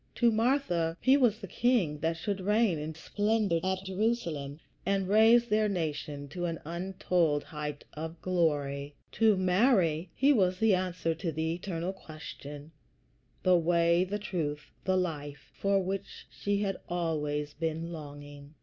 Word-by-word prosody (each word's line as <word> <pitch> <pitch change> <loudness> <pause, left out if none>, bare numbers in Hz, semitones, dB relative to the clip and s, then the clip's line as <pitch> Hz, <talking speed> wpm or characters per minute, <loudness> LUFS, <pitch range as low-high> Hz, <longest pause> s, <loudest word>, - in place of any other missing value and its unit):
To 235 -1 +4
Martha 215 - +1
he 260 +1 +5
was 245 -6 +3
the 200 - -8
King 195 -9 +1
that 165 +2 0
should 195 +3 -3
reign 210 -3 +2
in 155 +1 -5
splendor 205 +1 0
at 190 0 -1
Jerusalem, 185 -8 -2 0.2
and 195 0 0
raise 225 +4 +6
their 215 -1 +2
nation 150 -5 -3
to 175 +4 -4
an 165 -2 -3
untold 170 -3 0
height 150 -2 -6
of 160 +2 -6
glory; 145 -5 0 0.2
to 220 -3 +4
Mary 185 - +3
he 280 +2 +4
was 185 -6 +2
the 220 0 +4
answer 180 -3 0
to 165 +1 -3
the 160 +1 -1
eternal 175 0 -3
question 155 -3 -10 0.7
the 185 -1 +5
Way, 170 +1 +3
the 195 +3 -2
Truth, 150 -8 -4
the 185 0 +2
Life, 150 -5 -4
for 200 0 +1
which 195 +1 -5
she 200 0 -1
had 195 -1 -1
been - - -27
always 150 -4 -1
longing. 150 -3 -5
175 Hz, 150 wpm, -30 LUFS, 155-200 Hz, 0.7 s, raise